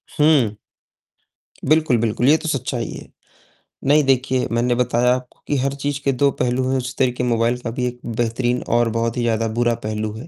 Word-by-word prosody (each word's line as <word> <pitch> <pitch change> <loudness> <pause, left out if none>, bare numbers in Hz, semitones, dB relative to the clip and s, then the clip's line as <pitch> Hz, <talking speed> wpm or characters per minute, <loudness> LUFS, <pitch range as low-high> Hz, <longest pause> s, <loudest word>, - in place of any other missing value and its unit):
हुँ। 140 -9 +3 1.1
बिल्कुल, 155 -3 +3
बिल्कुल, 115 +2 0
ये 155 +2 +6
तो 165 - -6
सच्चाई 125 -4 -2
है। - - -9 0.8
नहीं 150 +1 +5
देखिए, 130 -1 +1
मैंने 120 +1 +1
बताया 125 0 +2
आपको 125 -1 -9
कि 145 - 0
हर 135 +1 0
चीज़ 145 0 -3
के 140 - +2
दो 140 +2 +2
पहलू 125 +1 0
हैं, 135 - +1
उसी 130 0 -4
तरीक 125 -1 +1
मोबाइल 120 0 +1
का 120 - -5
भी 125 +1 -2
एक 125 0 -6
बेहतरीन 120 +2 -1 0.2
और 120 -1 +2
बहुत 115 +1 -1
ही - - 0
ज़्यादा 115 -1 0
बुरा 120 -1 +2
पहलू 110 0 -2
है, 120 +9 -9
125 Hz, 195 wpm, -20 LUFS, 115-135 Hz, 1.1 s, ये